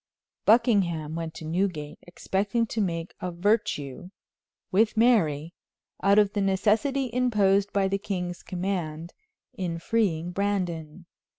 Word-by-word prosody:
Buckingham 195 -9 +3
went 165 -1 -5
to 160 - -8
Newgate, 160 -3 -2
expecting 200 +6 -1
to 220 0 -2
make 170 -3 -2
a 180 - -2
virtue, 175 - -1 0.6
with 215 +3 +2
Mary, 170 - +3 0.5
out 200 +1 +4
of 205 -1 +4
the 205 - 0
necessity 220 +7 +1
imposed 205 -5 +2
by 195 -1 +2
the 195 +1 -1
king's 180 -3 -4
command, 175 -3 -4 0.4
in 175 -3 -3
freeing 175 -3 0
Brandon. 180 -4 -2
190 Hz, 120 wpm, -26 LUFS, 170-210 Hz, 0.6 s, out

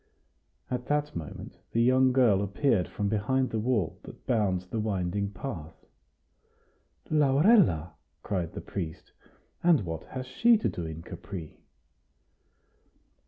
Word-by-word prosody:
At 125 -1 -3
that 150 0 0
moment 80 -3 -7 0.2
the 115 - +3
young 130 +1 +4
girl 120 -7 +4
appeared 100 0 +1
from 105 - -3
behind 110 +6 0
the 110 - -1
wall 110 -6 0
that - - -13
bounds 95 -6 +1
the 110 +5 -4
winding 100 -1 -1
path. 90 - -7 1.4
"Laurella!" 145 - +4 0.3
cried 90 -5 -2
the - - -6
priest; 85 -5 -6 0.5
"and 170 -7 +5
what 80 -1 -5
has 130 -1 -6
she 235 - +4
to 215 - 0
do 85 -2 -5
in 80 +1 -7
Capri?" 85 -4 -8
105 Hz, 125 wpm, -28 LUFS, 90-130 Hz, 1.4 s, and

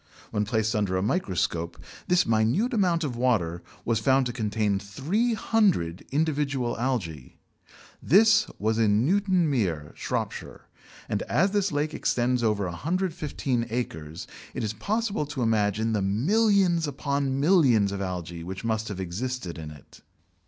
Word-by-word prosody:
When 105 0 0
placed 110 +1 0
under 100 -3 0
a 95 - 0
microscope, 95 - -1 0.3
this 180 0 +3
minute 115 - +2
amount 180 -6 +2
of 135 -5 -3
water 100 -9 0 0.2
was 115 -2 +1
found 130 +4 +3
to 120 - -3
contain 105 -3 0
300 175 - 0
individual 140 -4 0
algæ. 100 - -3 0.7
This 220 +6 +5
was 110 +2 0
in 110 +1 +3
Newton 190 0 +2
Mere 90 - -1
(Shropshire), - - -4 0.5
and - - -1
as 190 +5 +3
this 200 -2 +1
lake 150 +1 -1
extends 125 0 0
over 105 -3 +1
115 145 - -2
acres, 80 -10 -4 0.3
it - - -2
is 110 -1 -2
possible 205 - -1
to 145 -4 -3
imagine 110 0 +1
the 105 - +1
millions 175 - +2
upon 140 -1 -1
millions 135 - +4
of 100 - -4
algæ 90 -3 -4
which 95 +5 -6
must 110 0 -1
have 100 -3 -5
existed 95 +1 -4
in 80 -1 -7
it. 75 -3 -15
120 Hz, 140 wpm, -26 LUFS, 100-160 Hz, 0.7 s, This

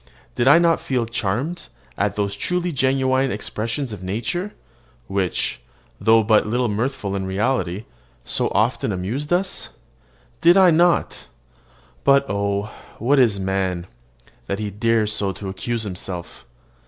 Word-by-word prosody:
Did 120 - 0
I 145 - +8
not 170 -1 +3
feel 125 -3 -1
charmed 120 - -2 0.3
at 100 0 0
those 100 -1 -1
truly 180 0 -1
genuine 130 -1 +1
expressions 110 +4 -3
of 100 - -8
nature, 115 - -3 0.5
which, 95 +4 -1 0.4
though 110 0 +5
but 105 0 +3
little 120 +2 0
mirthful 110 -1 -2
in 95 -1 -3
reality, 95 -1 -1 0.4
so - - 0
often - - 0
amused 110 - -3
us? 185 +2 0 0.7
Did 175 +3 +6
I 185 -2 +7
not 170 +2 +2 0.8
but 140 0 +5
oh! 100 +1 -1 0.3
what 135 +5 +2
is 110 -6 +3
man, 95 -2 -1 0.6
that 100 - -2
he 105 -1 -4
dares 110 +1 +1
so 100 -2 0
to 95 +1 -6
accuse 115 +4 -3
himself? 90 - -6
110 Hz, 135 wpm, -22 LUFS, 100-135 Hz, 0.8 s, I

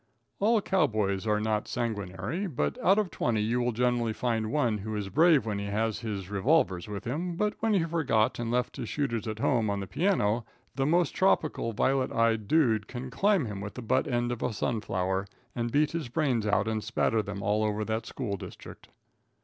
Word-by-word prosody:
All 220 +2 +3
cow 190 - +3
boys 100 -2 -1
are 105 0 +2
not 110 0 -1
sanguinary; 110 - -3
but 75 - -2
out 195 +2 +5
of 210 -4 0
twenty 115 -3 0
you 115 +4 +1
will 125 0 +1
generally 120 -1 +1
find 110 -3 -1
one 120 -8 +1
who 110 +2 -4
is 100 -2 -3
brave 160 - +4
when 105 -2 -2
he 100 - -4
has 110 +1 -1
his 105 -5 -4
revolvers 100 - +2
with 105 0 -6
him; 165 +8 -2
but 210 +4 0
when 225 -2 +2
he 180 - +3
forgot 155 -12 +1
and 120 -1 -2
left 125 +1 -1
his 115 - -4
shooters 115 -7 -2
at 110 -1 -3
home 115 -2 +1
on 100 0 -1
the 100 - -4
piano, 120 - +1 0.3
the 135 0 0
most 170 -1 +3
tropical 155 -10 +1
violet 130 +4 +1
eyed 115 -2 +1
dude 115 -8 +3
can 125 +1 -6
climb 195 +1 +2
him 105 -3 -5
with 105 0 -6
the 125 - -6
butt 130 +3 +1
end 120 0 0
of 120 - -4
a 120 - -1
sunflower, 95 -4 -1 0.3
and 120 -1 -2
beat 145 +2 +2
his 165 -7 -4
brains 125 -6 0
out 105 0 +2
and 110 -1 -1
spatter 110 0 +1
them 100 -1 -6
all 105 +2 +1
over 105 0 -1
that 110 +1 -2
school 105 -7 -3
district. - - -11
115 Hz, 205 wpm, -29 LUFS, 105-140 Hz, 0.3 s, out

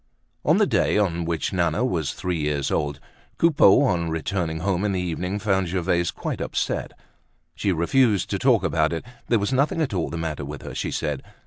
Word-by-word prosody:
On - - +4
the - - +4
day - - +2
on 85 -5 0
which 85 +3 -2
Nana 85 +5 +1
was 85 - -1
three 90 -2 -2
years 75 -2 -1
old, 70 -1 -1 0.4
Coupeau, 145 -12 +5
on 85 -3 +1
returning 80 0 -2
home 95 0 0
in 105 -2 0
the 95 - -1
evening, 90 +2 -2
found 95 -3 0
Gervaise 85 -1 0
quite - - -4
upset. - - -2 0.6
She 100 - -1
refused 100 +5 +2
to - - -1
talk - - +3
about 80 +1 +1
it; 80 - -4 0.2
there 120 - +3
was 100 +4 -1
nothing 140 +5 +1
at 150 -9 0
all 85 -6 -1
the 85 - -5
matter 80 -3 -3
with 75 0 -7
her, - - -7
she - - -2
said. 75 -3 -2
85 Hz, 200 wpm, -24 LUFS, 80-100 Hz, 0.6 s, Coupeau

